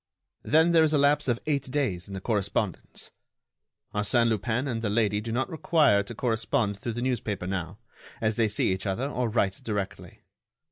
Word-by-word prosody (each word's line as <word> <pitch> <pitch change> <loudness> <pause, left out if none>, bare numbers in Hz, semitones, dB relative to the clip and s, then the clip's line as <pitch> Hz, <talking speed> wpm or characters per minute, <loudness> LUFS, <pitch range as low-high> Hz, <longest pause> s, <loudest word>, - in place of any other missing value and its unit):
Then 160 +3 +4
there 165 -1 +5
is 155 0 +2
a - - +4
lapse 145 +1 +3
of 120 -2 +1
eight 140 -3 -1
days 125 - -1
in 100 - -7
the 95 - -5
correspondence. 105 -2 -2 0.8
Arsène 115 +3 +2
Lupin 115 +4 -1
and 115 -4 -2
the 110 - -1
lady 105 -1 +1
do 115 +1 -5
not 125 +3 0
require 155 - +3
to 105 +4 -8
correspond 110 -2 0
through 115 +2 -4
the 120 +2 -3
newspaper 105 -7 -2
now, 90 0 -4 0.4
as 110 -1 0
they 115 -1 +2
see 105 -2 +1
each 95 +2 -4
other 115 +8 -1
or 125 -4 -1
write 100 -3 0
directly. 100 -3 -5
115 Hz, 185 wpm, -27 LUFS, 100-130 Hz, 0.8 s, there